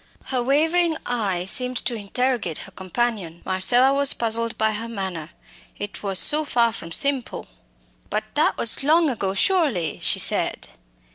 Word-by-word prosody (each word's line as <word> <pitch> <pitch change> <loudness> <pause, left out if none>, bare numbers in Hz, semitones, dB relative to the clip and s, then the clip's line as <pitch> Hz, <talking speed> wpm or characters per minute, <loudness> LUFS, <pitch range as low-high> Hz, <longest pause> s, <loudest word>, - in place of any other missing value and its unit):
Her 255 -2 -1
wavering 320 +5 +1
eye 200 -7 -2
seemed 250 +5 +2
to 240 - -1
interrogate 225 - -2
her - - -14
companion. 190 -3 -3
Marcella 240 +8 +4
was 280 0 +2
puzzled 230 0 -2
by 220 0 +1
her 220 +2 -5
manner 190 -8 -5 0.5
it 205 0 -7
was 195 -2 -2
so 305 +9 +5
far 235 -5 +2
from 170 -5 -9
simple. 275 +5 0 0.6
"But - - -1
that - - +1
was 230 +3 +1
long 315 +1 +3
ago, 195 -5 -3
surely," 260 - +1
she - - 0
said. - - 0
230 Hz, 150 wpm, -22 LUFS, 195-270 Hz, 0.6 s, so